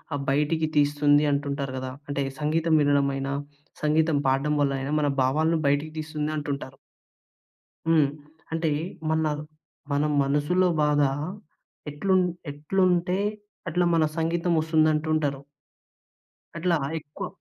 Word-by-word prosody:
ఆహ్, 140 - -3
బయటికి 150 +3 +1
తీస్తుంది 145 0 +4
అంటుంటారు 140 -1 -2
గదా! 130 0 -4 0.2
అంటే 140 -1 -1 0.2
సంగీతం 160 +2 +1
వినడమైనా 140 -1 +1 0.5
సంగీతం 155 0 +2
పాడడం 135 +3 +1
వలైనా 135 0 0
మన 150 - +1
భావాలను 155 +6 +2
బయటకి 145 +2 +1
తీస్తుంది 155 -1 -3
అంటుంటారు. 140 -2 -4 1.1
హ్మ్. 155 -3 +5 0.4
అంటే 160 0 0 0.4
మన 160 0 +1 0.2
ర్ - - -5 0.5
మన 140 +1 +2 0.2
మనసులో 150 +7 +2 0.2
బాధ 150 0 +3 0.9
ఎట్లున్ 185 +5 +2 0.3
ఎట్లుంటే 180 +4 +1 0.5
అట్లా 175 +2 +1
మన 160 - +3
సంగీతం 170 +2 0
వస్తుందంటుంటారు. 155 -2 +1 1.2
అట్లా 170 0 +1 0.2
ఎక్కువ 155 +6 -7
150 Hz, 105 wpm, -26 LUFS, 140-160 Hz, 1.2 s, హ్మ్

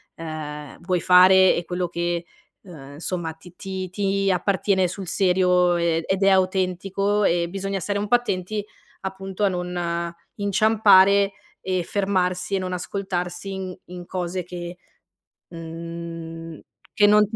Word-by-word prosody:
ehm, 150 -3 -7
vuoi 180 0 0
fare 185 +1 +7
e 170 - -3
quello 180 0 -2
che, 170 0 -2 0.4
ehm, 145 -7 -11
insomma 165 +1 -3
ti 165 +2 -16
ti 190 0 -5
ti 195 +1 0
appartiene 190 0 +1
sul 190 +1 -7
serio, 180 -1 +3
ehm, 170 -1 +1
ed 190 +1 0
è 195 - +6
autentico 190 +2 +1
e 170 -1 +1
bisogna 195 +1 -3
stare 205 +4 -1
un 210 - -2
po' 245 - +5
attenti 210 -3 -2 0.4
appunto 190 +1 -5
a - - +5
non 175 -1 -3 0.2
inciampare 200 -1 +5 0.3
e 185 -1 -1
fermarsi 185 -1 0
e - - +1
non 185 -1 -3
ascoltarsi 180 0 -4
in 190 -1 -5
in 180 0 -9
cose 180 0 -3
che, 175 0 -7 0.7
mhmm, 165 -1 -8 0.3
che 205 - +5
non 210 +1 +6
180 Hz, 140 wpm, -23 LUFS, 170-195 Hz, 0.7 s, fare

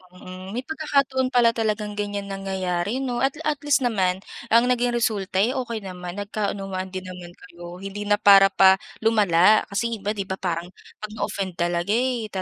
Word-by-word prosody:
Mm, 185 +1 -10
may 250 - -3
pagkakataon 280 -5 0
pala 240 -2 +4
talagang 210 -2 -2
ganiyan 205 -1 -4
nangyayari 195 +2 -2
'no, 250 -3 -2
at 270 - +1
at 295 -2 -1
least 290 -1 +3
naman 190 -6 +1 0.3
ang 235 +2 +5
naging 245 -1 +1
resulta, 205 -5 -1
eh, 235 +7 +2
okey 235 -4 -3
naman, 180 -1 -7
nagkaunawaan 195 -2 -4
din 185 0 -5
naman 180 -1 -9
kayo. 175 -4 -12
Hindi 195 +1 -6
na 205 - +4
para 195 -1 +7
pa 190 0 +6 0.2
lumala 210 -3 +4
kasi 230 +3 -1
iba 205 - -2
'di 200 -3 -4
ba 190 - -3
parang 175 -2 -3 0.3
'pag 215 0 -7
na-offend 195 -3 -3
talaga 175 +2 0
eh, 245 -3 0
205 Hz, 175 wpm, -23 LUFS, 185-235 Hz, 0.3 s, para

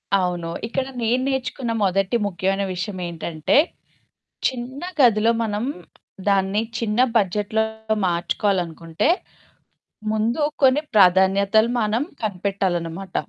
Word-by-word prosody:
అవును. 180 -3 -1 0.2
ఇక్కడ 260 +3 -2
నేను 235 +3 +1
నేర్చుకున్న 260 -2 -2
మొదటి 195 +3 +1
ముఖ్యమైన 195 +1 -1
విషయమేంటంటే 175 - -2 0.9
చిన్న 260 +2 -5 0.2
గదిలో 230 -3 +5
మనం 215 +1 -2 0.6
దాన్ని 195 +1 +2 0.2
చిన్న 220 0 -1 0.2
బడ్జెట్‌లో 210 +2 +1 0.4
మార్చుకోవాలనుకుంటే, 175 - 0 1.0
ముందు 220 +6 0 0.2
కొన్ని 265 +2 +5
ప్రాధాన్యతలు 195 +3 +4
మనం 215 +3 +1 0.2
కనిపెట్టాలన్నమాట. 190 -3 -2
200 Hz, 85 wpm, -22 LUFS, 180-225 Hz, 1.0 s, గదిలో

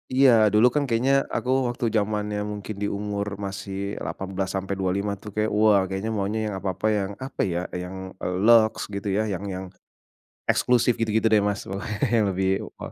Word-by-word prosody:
Iya 135 0 +7 0.2
dulu 110 +4 +6
kan 150 - +2
kayaknya 125 +4 +2 0.2
aku 125 - -2 0.2
waktu 120 0 -2
zamannya 105 0 -1
mungkin 105 +1 -6
di 100 - +1
umur 100 0 -3 0.2
masih 100 0 -5 0.3
18 95 0 -3
sampai 95 +1 -2
25 100 +2 0
tuh 105 - -8
kayaknya, 110 0 0
wah 105 -2 +6
kayaknya 95 +4 -3
maunya 100 +3 -1
yang 105 - -3
apa-apa 95 +2 -3
yang, 100 -1 -2
apa 135 - -4
ya, 85 - 0 0.2
yang, 90 +1 -7 0.3
eee, 90 0 -2
lux 115 -2 +6 0.2
gitu 100 +1 -4
ya, - - +2
yang 95 +2 -4
yang 95 +1 -5 0.9
eksklusif 125 -1 +3
gitu-gitu 110 0 +2
deh, 105 - +5
Mas, 100 - -2
pokoknya 100 +2 -4 0.2
yang 110 - +3
lebih 95 +1 0 0.3
wah. - - -7
105 Hz, 180 wpm, -25 LUFS, 95-110 Hz, 0.9 s, Iya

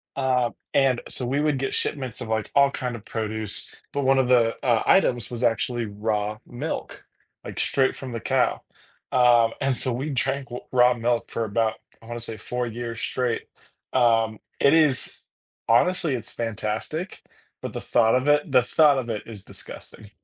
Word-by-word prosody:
uh, 130 -3 +1 0.2
and 135 -3 +3
so 125 - -2
we 135 +4 0
would 150 -3 +1
get 135 - -2
shipments 130 -4 -3
of, 115 - -5
like, 110 -1 -1
all 140 -1 +5
kinds 125 -2 -3
of 110 - -10
produce, 110 -2 -3 0.2
but 140 -1 -1
one 135 0 +4
of 130 - +2
the, 115 -2 +4
uh, 115 -3 +3
items 120 - +3
was 120 0 -4
actually 120 0 +1
raw 105 0 -2
milk, 140 +7 -5 0.4
like, - - -7
straight 135 -1 +2
from 130 -2 -7
the 115 - -3
cow. - - +1 0.5
Um, 120 -2 +5
and 135 -2 +1
so 130 -3 +1
we 135 +5 -3
drank 135 0 -1
w 120 - -6
raw 125 0 +6
milk 120 0 -1
for 115 - -1
about, 110 +1 0 0.3
I 115 - -14
want 120 0 -5
to 115 - -5
say 115 - -5
4 125 0 -3
years 115 0 -5
straight. 125 -3 -1 0.5
Um, 115 -3 +3 0.2
it 140 - +5
is 150 -5 +2 0.5
honestly, 165 +6 +3
it's 115 - -6
fantastic, 115 - -4 0.4
but - - -5
the - - -4
thought 115 0 +3
of 130 +2 0
it 145 0 +3
the 125 -2 +5
thought 145 +2 +4
of 120 -2 -5
it 110 -2 -3
is 105 -4 -10
disgusting. 105 -2 -11
120 Hz, 185 wpm, -24 LUFS, 115-135 Hz, 0.5 s, raw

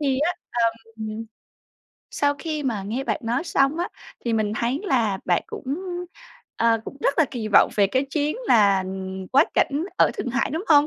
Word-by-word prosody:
thì 270 -3 +1
á, 320 +5 +2 0.2
ờm, 225 -2 -2 1.0
sau 285 0 +1
khi 310 -2 -3
mà 230 -7 -1
nghe 230 +7 -3
bạn 305 - -1
nói 240 +7 0
xong 285 -1 +2
á, 350 - -1 0.4
thì 235 - 0
mình 215 -2 +1
thấy 245 +6 0
là 225 - +1
bạn 175 -2 +2
cũng, - - -8 0.9
ờ, 225 -1 +3
cũng - - -8
rất 280 - +1
là 320 - +6
kỳ 225 -4 -4
vọng - - +6
về 200 -1 +5
cái 260 +7 0
chuyến 300 +5 0
là 200 - +5 0.5
quá 280 +4 +7
cảnh 290 +4 +2
ở - - +5
Thượng - - -3
Hải, 265 +2 0
đúng 325 +7 -3
hông? 295 -1 +6
255 Hz, 190 wpm, -24 LUFS, 225-290 Hz, 1.0 s, quá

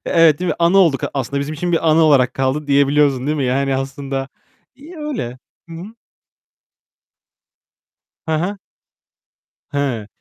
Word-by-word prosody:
Evet, 165 -3 +4
değil 180 -1 -2
mi? - - -1
Anı 170 +3 +4
olduk. 165 -8 +3
Aslında 140 +1 -2
bizim 145 +2 -4
için 175 +3 -3
bir 165 -1 +1
anı 155 +1 +4
olarak 135 -5 +3
kaldı 135 +3 -1
diyebiliyorsun 140 -1 +2
değil 150 - 0
mi? 140 - -1
Yani 135 +2 0
aslında 135 0 -4 0.5
iyi 300 +7 -13
öyle. 260 - -5 0.3
Hı 165 - -9
hı. 190 +7 -9 2.3
He 160 - -1
he. 190 +6 -3 1.1
He, 135 -7 -2
145 Hz, 140 wpm, -18 LUFS, 135-170 Hz, 2.3 s, Evet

